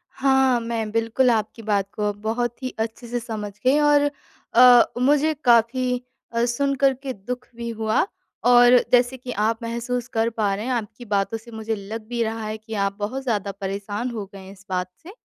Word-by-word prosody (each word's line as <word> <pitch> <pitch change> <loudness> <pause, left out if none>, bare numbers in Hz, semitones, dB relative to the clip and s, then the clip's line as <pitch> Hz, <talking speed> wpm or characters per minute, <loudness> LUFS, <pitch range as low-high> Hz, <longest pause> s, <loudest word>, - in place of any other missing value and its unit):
हाँ, 265 -2 +3
मैं 230 -2 -3
बिल्कुल 230 +3 +2
आपकी 220 0 -2
बात 205 -3 0
को 210 -1 -1
अब 205 0 -7
बहुत 235 +3 -2
ही 255 - -3
अच्छे 225 +2 -4
से 240 +1 -2
समझ 220 -3 -5
गई 265 +3 +5
और 290 -1 +4 0.4
अ, 245 0 +8 0.2
मुझे 290 +4 +3
काफ़ी 245 +1 +3 0.3
अ, 230 0 +1
सुनकर 275 +2 +1
के 265 0 -6
दुख 250 +4 -7
भी 235 0 -5
हुआ, 220 +4 0 0.4
और 245 0 +7
जैसे 245 +1 +3
कि 250 0 -7
आप 225 +1 0
महसूस 235 +1 -3
कर 225 -1 0
पा 215 -3 0
रहे 210 +3 -5
हैं 260 - -2
आपकी 235 0 -4
बातों 200 0 0
से 230 +2 -15
मुझे 220 0 -3
लग 215 +2 -7
भी 240 0 -2
रहा 225 0 -3
है 215 0 -4
कि 220 +1 -10
आप 200 0 -1
बहुत 245 +7 -3
ज़्यादा 210 -6 -1
परेशान 205 +4 -3
हो 220 -4 -5
गए 195 - -9
हैं 190 0 -11
इस 195 0 -16
बात 180 -1 -2
से 335 - -11
230 Hz, 200 wpm, -23 LUFS, 215-250 Hz, 0.4 s, अ